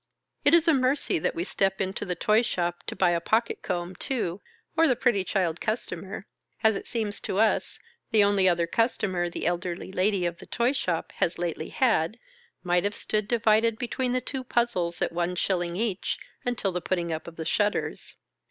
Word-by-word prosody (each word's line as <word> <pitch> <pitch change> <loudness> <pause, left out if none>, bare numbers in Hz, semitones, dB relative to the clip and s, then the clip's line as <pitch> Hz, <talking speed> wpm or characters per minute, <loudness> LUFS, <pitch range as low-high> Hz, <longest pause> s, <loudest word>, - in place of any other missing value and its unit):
It 290 - +6
is 335 0 +3
a 325 - +6
mercy 260 - +2
that - - -1
we 170 - -1
step 195 0 0
into 190 +1 -2
the 180 -2 -2
toy 215 +4 +3
shop 175 -7 -2
to - - -3
buy 180 -2 +3
a 170 - +2
pocket 220 +6 +1
comb 180 0 -3
too, 205 -8 -2 0.3
or 325 0 +5
the 255 - +3
pretty 230 -6 +2
child 180 -4 0
custamer 215 -3 -3 0.4
(as 220 -1 +5
it - - -5
seems 215 -3 -3
to 190 - -3
us, 220 +1 +2 0.3
the 220 -3 +5
only 200 -2 +4
other 170 -1 +2
customer 185 -3 0
the - - -5
elderly 175 +1 -2
lady 190 -1 +1
of 170 0 -2
the - - -12
toy 240 +1 +1
shop 180 - -2
has 170 - +1
lately 170 -2 -3
had), 225 - +2 0.5
might 175 -1 +2
have 205 0 -1
stood 210 -1 -1
divided 225 -1 +3
between 250 +1 -2
the 255 0 +1
two 265 0 -4
puzzles 210 -9 0
at - - -1
one 175 +1 -1
shilling 175 -1 0
each^ 205 -1 -1 0.3
until 240 -5 0
the 180 0 -3
putting 170 -2 -1
up 160 +1 -5
of 170 - -9
the 160 - -5
shutters. 205 +5 -1
195 Hz, 195 wpm, -27 LUFS, 175-230 Hz, 0.5 s, It